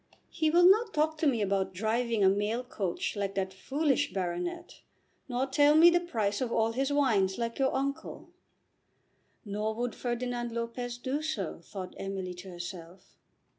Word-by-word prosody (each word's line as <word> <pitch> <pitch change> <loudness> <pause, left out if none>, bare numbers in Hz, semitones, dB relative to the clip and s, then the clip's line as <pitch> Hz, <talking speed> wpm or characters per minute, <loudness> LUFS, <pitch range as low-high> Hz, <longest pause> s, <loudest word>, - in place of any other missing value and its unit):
He 315 -2 +1
will 350 +3 +6
not 425 +3 +4
talk 310 +1 +1
to 310 - +2
me 235 -6 +2
about 190 -1 -1
driving 225 +2 0
a - - +7
mail 205 +5 +1
coach 200 -8 -3
like 200 -1 -2
that 190 -1 -2
foolish 285 +7 0
baronet, 175 -2 -4 0.5
nor 250 +1 0
tell 290 +2 +4
me 335 +2 +8
the 350 - +4
price 220 -12 -1
of 245 -2 -1
all 225 0 +2
his 270 +4 -1
wines 220 -10 +2
like 230 +1 -3
your 265 -1 +3
uncle." 275 +1 -4 1.1
Nor 210 +1 -2
would 240 +1 -2
Ferdinand 240 -1 -3
Lopez 235 +1 -4
do 260 +4 -2
so, 230 - -3
thought 185 +1 -8
Emily 195 -2 -4
to 180 +2 -10
herself. 175 0 -9
230 Hz, 165 wpm, -30 LUFS, 195-275 Hz, 1.1 s, me